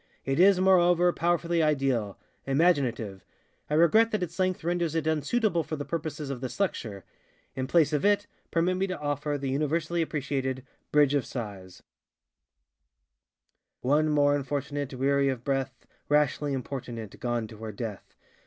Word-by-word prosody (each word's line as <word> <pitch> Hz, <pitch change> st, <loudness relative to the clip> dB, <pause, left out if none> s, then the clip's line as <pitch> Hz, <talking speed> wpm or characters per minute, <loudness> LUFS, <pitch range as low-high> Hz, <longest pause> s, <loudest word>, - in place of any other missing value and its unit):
It 135 Hz, +3 st, 0 dB
is, 190 Hz, 0 st, +6 dB
moreover, 180 Hz, -2 st, +4 dB
powerfully 170 Hz, 0 st, +1 dB
idealŌĆöimaginative. 135 Hz, -, 0 dB, 0.5 s
I 150 Hz, -, +1 dB
regret 170 Hz, +8 st, +5 dB
that 215 Hz, -4 st, -1 dB
its 170 Hz, +1 st, -6 dB
length 185 Hz, -2 st, 0 dB
renders 170 Hz, -1 st, -1 dB
it 160 Hz, -2 st, 0 dB
unsuitable 170 Hz, +5 st, +1 dB
for 155 Hz, -, -4 dB
the 145 Hz, -1 st, -5 dB
purposes 155 Hz, -3 st, -4 dB
of 130 Hz, -3 st, -5 dB
this 130 Hz, +6 st, -6 dB
lecture. 110 Hz, -, -2 dB, 0.5 s
In 130 Hz, -1 st, -2 dB
place 160 Hz, -2 st, +3 dB
of 150 Hz, -, +1 dB
it 205 Hz, 0 st, +3 dB, 0.2 s
permit 175 Hz, +2 st, +1 dB
me 190 Hz, +1 st, 0 dB
to 185 Hz, -, -4 dB
offer 145 Hz, 0 st, -2 dB
the 135 Hz, -1 st, -3 dB
universally 155 Hz, +4 st, 0 dB
appreciated 135 Hz, -4 st, -2 dB, 0.3 s
ŌĆ£Bridge 145 Hz, -1 st, +4 dB
of 140 Hz, -5 st, +1 dB
SighsŌĆØ:ŌĆö 100 Hz, -7 st, -7 dB, 2.0 s
One 150 Hz, +4 st, +2 dB
more 145 Hz, -1 st, +3 dB
Unfortunate, 145 Hz, 0 st, -3 dB
Weary 140 Hz, +1 st, +2 dB
of 125 Hz, -3 st, -3 dB
breath, 135 Hz, -2 st, -2 dB, 0.2 s
Rashly 150 Hz, 0 st, +2 dB
importunate 125 Hz, -5 st, -5 dB
Gone 120 Hz, -2 st, -1 dB
to 110 Hz, -, -11 dB
her 110 Hz, 0 st, -6 dB
death! 105 Hz, -1 st, -7 dB
145 Hz, 145 wpm, -28 LUFS, 130-170 Hz, 2.0 s, is